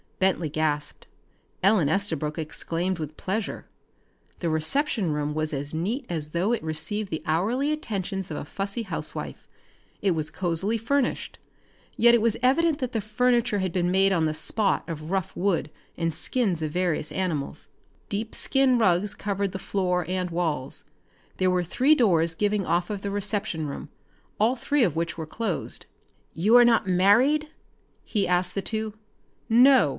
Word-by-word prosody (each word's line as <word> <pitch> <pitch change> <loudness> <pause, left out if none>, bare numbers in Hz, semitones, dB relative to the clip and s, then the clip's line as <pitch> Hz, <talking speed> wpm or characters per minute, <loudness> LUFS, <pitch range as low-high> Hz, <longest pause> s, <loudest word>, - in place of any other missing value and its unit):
Bentley 185 -4 +1
gasped. 150 -1 -2 0.6
Ellen 190 -7 +4
Estabrook 160 -5 0
exclaimed 165 +3 -2
with 155 -1 -6
pleasure. 200 +2 -3 0.7
The 170 - -1
reception 185 - +1
room 150 0 -1
was 155 0 -1
as 145 0 -3
neat 215 - -2
as 155 -3 -3
though 180 +8 0
it 235 - -2
received 175 +7 -2
the 160 - -4
hourly 225 - +1
attentions 195 - -3
of 155 - -4
a - - -5
fussy 200 +8 -3
housewife. 195 - -4 0.5
It 200 - +1
was 155 -3 -1
cozily 190 +5 0
furnished, 255 +4 -1 0.6
yet 235 0 +6
it 235 - +4
was 230 -1 +1
evident 310 +4 +3
that 255 -3 -2
the 225 - -1
furniture 230 0 +1
had 185 -2 -1
been 175 0 0
made 195 +1 +3
on 170 -4 +2
the 155 - 0
spot 205 +5 +1
of 155 -2 -6
rough 190 -2 -2
wood 180 -5 0 0.3
and 165 -1 -1
skins 195 - 0
of 155 -1 -2
various 175 -3 -1
animals. 170 -7 -3 0.4
Deep 215 +2 -3
skin 270 -2 +4
rugs 195 -2 +2
covered 200 -1 -2
the 190 - -4
floor 180 -3 -1
and 185 0 -2
walls. 160 -6 -2 0.5
There 185 0 +2
were 180 -1 +1
three 260 - +3
doors 170 - +2
giving 205 +1 +1
off 175 +3 0
of 205 -2 -4
the 200 - -3
reception 200 -5 -1
room, 140 - -7 0.5
all 225 +5 +3
three 280 +2 +1
of 175 -8 +1
which 165 0 -2
were 160 -2 -5
closed. 205 -1 -2 0.5
"You 210 +9 +5
are 245 - +8
not 230 -4 +3
married?" 235 +12 +4 0.5
he 205 -3 -1
asked 180 0 +2
the 195 - -1
two. 220 +1 -3 0.6
"No!" 245 - +6
190 Hz, 165 wpm, -26 LUFS, 165-220 Hz, 0.7 s, are